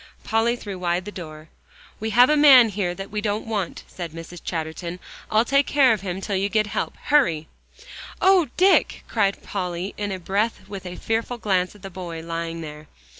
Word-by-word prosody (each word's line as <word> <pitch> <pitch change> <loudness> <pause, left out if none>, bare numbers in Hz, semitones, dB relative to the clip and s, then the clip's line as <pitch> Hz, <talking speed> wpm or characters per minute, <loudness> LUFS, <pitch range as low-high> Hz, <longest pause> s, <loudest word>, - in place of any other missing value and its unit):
Polly 225 +2 +1
threw 200 -5 -7
wide 175 0 -1
the 210 - -6
door. 155 -4 -9 0.5
"We 220 - -2
have 245 +3 +6
a - - +5
man 270 -6 +8
here 185 -3 -2
that 195 +2 -8
we 210 0 -2
don't 210 0 -2
want," 210 -6 -3
said 170 -3 -7
Mrs. 165 +1 -9
Chatterton. 170 +2 -4 0.3
"I'll 220 +2 +3
take 275 +2 +3
care 270 -4 +5
of 210 - -3
him 190 -1 -4
till 200 0 -2
you 195 +2 0
get 215 0 +2
help. 205 - -3
Hurry!" 240 - +2 0.7
"Oh, 375 -4 +5
Dick!" 380 +2 +3
cried 200 -3 0
Polly 180 -1 -4
in 205 -1 -3
a 190 - -3
breath, 195 +2 -1
with 195 -2 -7
a 180 - -6
fearful 225 +4 -2
glance 190 -4 0
at 205 - -17
the 195 - -7
boy 170 -3 -6
lying 165 0 -4
there. 150 -1 -9
195 Hz, 195 wpm, -23 LUFS, 175-225 Hz, 0.7 s, man